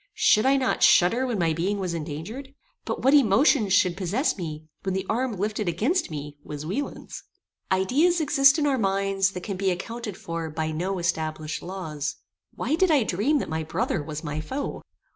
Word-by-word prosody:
Should 215 +4 +4
I 275 +1 +4
not 260 -1 0
shudder 230 +9 +5
when 240 -4 -1
my 165 -3 +1
being 185 +6 -1
was 185 -3 -3
endangered? 170 - -6 0.3
But - - -4
what 270 +2 +5
emotion 225 -4 +4
should 185 -2 +3
possess 200 - 0
me 155 -4 -6 0.2
when 190 -1 -2
the 190 0 -2
arm 245 +2 0
lifted 210 +1 -2
aginst 260 - 0
me 145 -1 -7
was 150 0 -7
Wieland's? 245 - -5 0.5
Ideas 275 - +3
exist 275 -2 +5
in 300 - +1
our 275 -3 +1
minds 195 -1 +1
that 180 - -6
can 200 -3 -4
be 195 0 +1
accounted 210 +3 -4
for 165 -1 -5
by 155 0 -3
no 180 +5 -2
established 155 -2 -2
laws. 160 -6 -4 0.4
Why 265 - -2
did 370 +3 +3
I 295 -6 +4
dream 215 +11 +1
that - - -2
my 160 0 -2
brother 165 +1 -1
was 155 +1 -6
my 150 -1 -3
foe? 270 - -4
195 Hz, 185 wpm, -25 LUFS, 165-255 Hz, 0.5 s, shudder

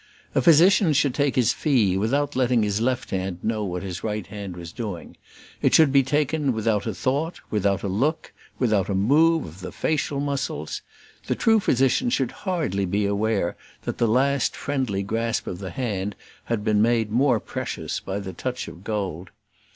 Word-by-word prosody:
A - - +3
physician 175 +1 +6
should 140 -2 +2
take 145 0 +1
his 125 -3 +3
fee 120 - +2
without 140 +9 0
letting 125 -3 +2
his 105 +1 0
left 130 +1 -1
hand 95 -1 -2
know 110 -1 -1
what 90 -2 -3
his 95 -2 -6
right 105 -3 -2
hand 100 -2 -7
was 85 -1 -8
doing; 100 -6 -6 0.5
it - - +4
should 155 -4 +6
be 140 0 +6
taken 145 +1 0
without 110 -1 0
a 110 - -1
thought, 140 - -1
without 100 -2 +1
a - - -1
look, 135 - -1 0.2
without 105 -6 +1
a 100 - 0
move 155 +11 +3
of 80 +3 -11
the 90 - -7
facial 145 -2 -1
muscles; 135 - -3 0.5
the - - 0
true 225 -1 +4
physician 135 - +2
should 135 - 0
hardly 155 - -2
be 100 +3 0
aware 100 -2 0 0.3
that - - -4
the 115 - +3
last 135 +4 +2
friendly 130 -9 -2
grasp 115 +3 -1
of 90 - -5
the 95 -2 -5
hand 105 -6 -3 0.3
had 115 -3 -2
been 105 -1 +2
made 115 -1 +2
more 125 0 +3
precious - - -4
by 95 - -4
the 95 -2 -6
touch 125 -1 -4
of 85 - -11
gold. 95 -5 -3
115 Hz, 180 wpm, -24 LUFS, 100-140 Hz, 0.5 s, physician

